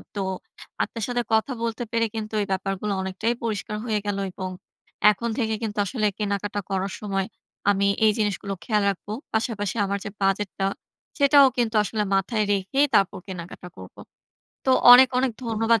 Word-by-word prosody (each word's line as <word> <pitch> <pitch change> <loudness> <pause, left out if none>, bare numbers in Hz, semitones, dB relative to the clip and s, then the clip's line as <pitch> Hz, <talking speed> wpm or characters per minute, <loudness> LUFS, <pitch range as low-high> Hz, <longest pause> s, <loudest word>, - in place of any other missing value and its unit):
তো 200 - -1 0.6
আপনার 230 - -5
সাথে 245 -1 0
কথা 220 +5 +2
বলতে 230 +1 -2
পেরে 230 0 +2
কিন্তু 220 0 -5
এই 200 - -2
ব্যাপারগুলো 195 +2 -2
অনেকটাই 190 +5 -1
পরিষ্কার 210 -2 -3
হয়ে 215 -3 0
গেলো, 200 -1 -1
এবং 185 +1 -5 0.6
এখন 235 +3 -3
থেকে 220 -4 0
কিন্তু 215 -2 -4
আসলে 215 +1 -1
কেনাকাটা 205 -1 -2
করার 195 0 -2
সময় 195 -2 -1 0.4
আমি 200 0 +3 0.2
এই 215 - +6
জিনিসগুলো 205 -2 -1
খেয়াল 210 -3 +1
রাখব। 195 0 -5 0.3
পাশাপাশি 220 -3 -1
আমার 200 +1 -1
যে - - -3
বাজেটটা, 195 0 0 0.5
সেটাও 280 -1 +7
কিন্তু 235 -2 0
আসলে 210 +1 -1
মাথায় 210 +3 +1
রেখেই 200 +9 +2
তারপর 195 -1 +2
কেনাকাটা 180 -1 -8
করবো। 95 0 -12 0.7
তো - - +4 0.2
অনেক, 255 +1 +9
অনেক 255 -1 +1
ধন্যবাদ 225 0 +2
210 Hz, 160 wpm, -24 LUFS, 195-230 Hz, 0.7 s, অনেক